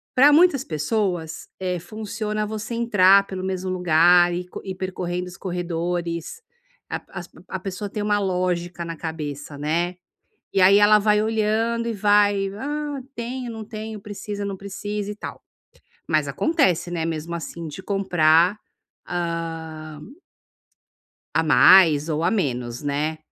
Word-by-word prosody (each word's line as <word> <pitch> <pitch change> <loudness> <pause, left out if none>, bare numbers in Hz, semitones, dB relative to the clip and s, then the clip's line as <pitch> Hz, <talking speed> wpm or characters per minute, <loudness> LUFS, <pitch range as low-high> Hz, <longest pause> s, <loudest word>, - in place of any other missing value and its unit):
para 280 +3 +7
muitas 300 -4 +5
pessoas, 170 - -2
eh, 180 -2 -2
funciona 215 +2 -4
você 220 +2 -5
entrar 200 -4 +5
pelo 185 -1 -5
mesmo 185 0 -3
lugar 175 0 +5
e 180 +1 -3
co - - -8
ir 190 -1 -5
percorrendo 180 -1 -4
os 180 - -10
corredores, 175 - -3 0.5
a - - -3
as - - -7 0.2
a - - -4
pessoa 200 +1 -5
tem 210 +1 -4
uma 205 0 +2
lógica 180 -2 -1
na 165 0 -5
cabeça, 150 -3 -6
né. 170 +5 -1 0.6
E 195 - +3
aí 195 +2 +7
ela 210 +1 +6
vai 210 0 +3
olhando 225 +2 0
e 230 - -1
vai: 205 -1 +3
"Ah 290 +3 -4
tenho, 245 +1 -5
não 225 -1 -7
tenho, 215 0 -7
precisa, 205 0 -6
não 200 -1 -3
precisa" 205 +1 -5
e - - -7
tal. - - -8 0.7
Mas - - +1
acontece, 230 - +1
né, 165 -2 -2
mesmo 165 +1 -4
assim, 170 0 -6
de 150 +6 -8
comprar, 180 -1 +3 0.5
hã 165 -3 -4 1.3
a - - +3
mais 155 +2 +6
ou 155 +1 -1
a 175 - +2
menos 125 - -2
né, 150 +2 -1
185 Hz, 145 wpm, -23 LUFS, 165-210 Hz, 1.3 s, para